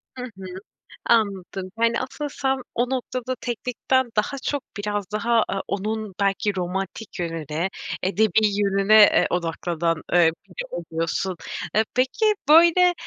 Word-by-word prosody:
Hı 250 - -6
hı. 195 -6 -9 0.6
Anladım. 195 -4 0
Yani, 230 0 +2
asıl 290 +3 -5
sen 270 -1 -1 0.2
o 245 +1 +1
noktada 255 -1 -3
teknikten 250 +1 -1
daha 215 +6 0
çok 285 -2 -2
biraz 205 -1 -3
daha, 230 +1 +2
aaa, 195 - -2
onun 215 0 -3
belki 200 0 +1
romantik 190 +3 -4
yönüne, 165 +1 -2 0.3
edebî 215 +2 +3
yönüne, 200 +1 +3
eee, - - +4
odaklanan, 165 -1 -1
eee, 170 -2 +5 0.2
biri 180 - -7
oluyorsun. 170 +2 -2 0.4
E, 220 - +5
peki, 260 - +1 0.2
böyle, 345 +3 +7
210 Hz, 130 wpm, -23 LUFS, 185-250 Hz, 0.6 s, böyle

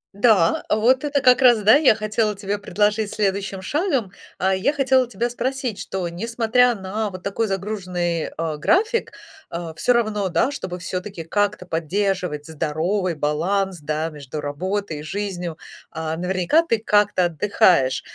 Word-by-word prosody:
Да, 200 -6 +3
вот 245 +5 +3
это 290 -1 +1
как 255 0 +5
раз, 240 -4 +6
да, 215 +4 +7
я 290 -5 +5
хотела 215 0 -1
тебе 200 0 -2
предложить 205 +2 0
следующим 195 -2 -1
шагом. 270 - -1 0.2
А 190 +1 +1
я 190 +9 +1
хотела 265 -3 +2
тебя 235 +2 -2
спросить, 250 -2 -3
что 185 -2 -4
несмотря 230 +6 +2
на 210 +1 -3
вот 185 -2 -9
такой 200 +4 -1
загруженный, 185 -4 -2
э, 160 -1 -2
график, 430 - +1 0.4
э, 170 -1 -5
всё 250 - +1
равно, 215 -5 +1
да, 175 +10 +1
чтобы 185 -10 -6
всё-таки 180 0 -5
как-то 205 +2 -1
поддерживать 175 -2 -2
здоровый 165 +4 -1
баланс, 175 +6 -1
да, 155 +2 -2
между 150 -1 -8
работой 165 +4 -3
и - - -8
жизнью, 180 -2 -4 0.3
а, 160 0 -3
наверняка 185 - +1
ты 230 -9 +1
как-то 210 -4 +2
отдыхаешь, 165 -5 +2
195 Hz, 150 wpm, -22 LUFS, 170-220 Hz, 0.4 s, да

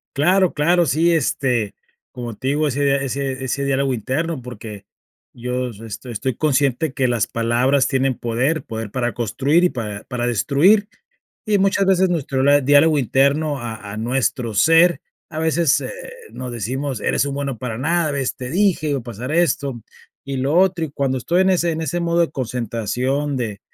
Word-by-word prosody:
Claro, 180 +5 +3
claro. 170 +4 +3
Sí, 165 +5 +2
este, 125 -8 0 0.4
como 120 -3 -6
te 130 - -6
digo, 150 +2 +1
ese 140 0 +1
ese 135 0 -3
ese 135 +2 -2
diálogo 135 -1 +1
interno, 135 +6 -2
porque 110 -4 -9 0.5
yo 125 +1 -3
es 105 -2 -12
esto 115 +3 -8
estoy 120 +2 -3
consciente 145 0 +1
que 130 -2 +1
las 120 -3 0
palabras 120 +4 +1
tienen 135 -2 +1
poder. 125 +7 -1
Poder 110 -1 -6
para 120 -2 -1
construir 135 - +1
y - - +3
para 105 -5 -5
para 125 -2 -3
destruir, 175 - +3 0.6
y 210 -2 +2
muchas 195 0 +2
veces 190 -1 +3
nuestro 140 -6 -1
lad 145 0 +5
diálogo 145 +3 +5
interno 140 +3 +1
a 110 -4 -7
a - - -7
nuestro 120 0 -1
ser, 165 - +5 0.3
a 155 0 -5
veces, 160 -2 +2
eh, - - -5 0.4
nos 125 -1 -6
decimos: 130 +3 -3
"Eres - - +1
un 140 - -3
bueno 140 -4 -3
para 120 -3 -4
nada. 160 +3 0
¿Ves? 135 -2 -2
Te 125 -1 -6
dije, 175 -3 +1
iba 140 - 0
a - - -13
pasar 120 +4 -6
esto, 140 -8 0 0.4
y 135 -1 -4
lo 140 +5 0
otro". 185 -3 +3
Y 145 - -7
cuando 135 -2 -1
estoy 175 +9 +1
en 190 - +3
ese 175 -2 +2
en 160 - -3
ese 175 +2 -2
modo 170 0 +1
de 170 - +2
concentración, 125 +3 -2
de 110 -4 -4
135 Hz, 180 wpm, -20 LUFS, 120-160 Hz, 0.6 s, lad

